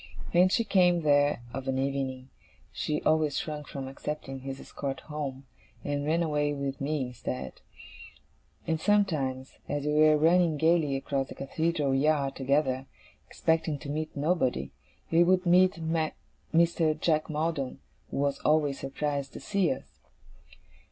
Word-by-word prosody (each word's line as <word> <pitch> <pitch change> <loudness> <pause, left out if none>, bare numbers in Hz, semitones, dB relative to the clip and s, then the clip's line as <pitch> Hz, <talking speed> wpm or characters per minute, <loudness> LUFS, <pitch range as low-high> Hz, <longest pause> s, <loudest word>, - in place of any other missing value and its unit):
When 180 +2 +5
she 230 - +2
came 180 -5 +3
there 145 -4 +3
of 135 0 -5
an 135 0 0
evening, 130 -1 -2 0.4
she 150 0 -2
always 155 -2 +2
shrunk 150 -2 -4
from 135 -2 -6
accepting 135 0 -5
his 135 +1 -6
escort 135 -2 -5
home, 140 -3 -5 0.4
and 145 0 -2
ran 165 +2 +2
away 150 -2 0
with 140 -1 -4
me 145 0 0
instead. 65 - -6 1.0
And 160 -1 -1
sometimes, 150 -11 0
as 145 0 -2
we 150 - +1
were 155 0 +5
running 165 0 +4
gaily 160 -2 +3
across 135 0 -2
the - - -9
Cathedral 150 0 -1
yard 140 0 +2
together, 135 -1 0 0.4
expecting 160 -2 0
to 140 - -9
meet 155 0 -4
nobody, 140 - 0 0.4
we 165 +1 +6
would 185 +1 +3
meet 180 +2 +5
Mr. 160 0 0
Jack 155 -1 +1
Maldon, 155 -3 -2 0.3
who - - -5
was 140 0 0
always 150 -3 +2
surprised 140 0 -3
to - - -7
see 200 -4 +1
us. 130 - -7
150 Hz, 145 wpm, -29 LUFS, 135-160 Hz, 1.0 s, we